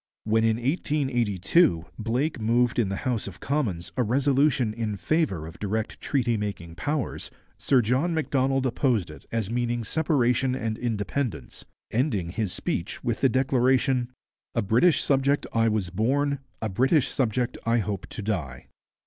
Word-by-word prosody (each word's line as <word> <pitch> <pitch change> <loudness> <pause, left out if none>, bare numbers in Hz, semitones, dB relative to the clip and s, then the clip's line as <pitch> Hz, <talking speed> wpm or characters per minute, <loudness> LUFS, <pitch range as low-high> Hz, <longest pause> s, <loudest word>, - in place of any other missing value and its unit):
When 110 +1 +2
in 110 -1 +3
1882 120 - +1
Blake 125 +7 -1
moved 120 +2 +2
in 110 -5 +2
the 100 - -2
House 120 -5 -1
of 95 -2 -9
Commons 115 - -2
a 130 - +1
resolution 135 0 +2
in 110 -2 -3
favour 95 - 0
of 80 +1 -10
direct 105 +2 -3
treaty 120 -5 +1
making 100 -5 -5
powers, 145 - -3 0.3
Sir 125 +1 +3
John 130 +10 +1
Macdonald 135 -4 +1
opposed 120 - +1
it 75 - -14
as 115 -2 -2
meaning 120 0 -1
separation 130 -3 +1
and 115 -3 -2
independence, 110 - -3 0.3
ending 110 - 0
his 105 -1 -2
speech 85 +1 -3
with 120 -1 -1
the 135 - +5
declaration, 130 0 +2 0.4
'A 115 - +1
British 120 - +4
subject 140 +1 +2
I 115 0 +3
was 105 -5 -1
born, 140 +8 +1 0.2
a 110 - 0
British 130 - +2
subject 125 -1 0
I 115 +1 +2
hope 100 -3 -2
to 105 - -7
die.' 90 -11 -3
120 Hz, 150 wpm, -26 LUFS, 105-135 Hz, 0.4 s, the